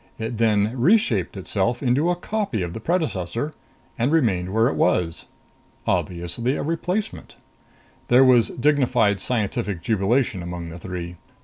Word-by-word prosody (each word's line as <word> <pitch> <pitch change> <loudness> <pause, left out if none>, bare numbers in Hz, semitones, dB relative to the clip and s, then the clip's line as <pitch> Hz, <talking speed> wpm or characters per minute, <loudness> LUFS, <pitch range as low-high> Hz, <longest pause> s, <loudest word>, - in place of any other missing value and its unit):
It 115 0 -4
then 110 -1 +2
reshaped 125 - +2
itself 100 +6 -1
into 135 +7 +2
a 175 - +2
copy 185 - -2
of 85 -1 -5
the - - -5
predecessor, 145 - -2 0.5
and 120 +5 +1
remained 100 - +1
where 110 +3 +3
it - - 0
was. 85 -2 0 0.6
Obviously 90 - -1
a - - -3
replacement. 180 +6 -3 0.7
There 125 +2 +6
was 125 -3 +5
dignified 125 -7 +2
scientific 105 -5 -2
jubilation 110 0 +1
among 85 -1 -6
the 85 +2 -9
three. 90 -1 -6
115 Hz, 135 wpm, -23 LUFS, 95-135 Hz, 0.7 s, There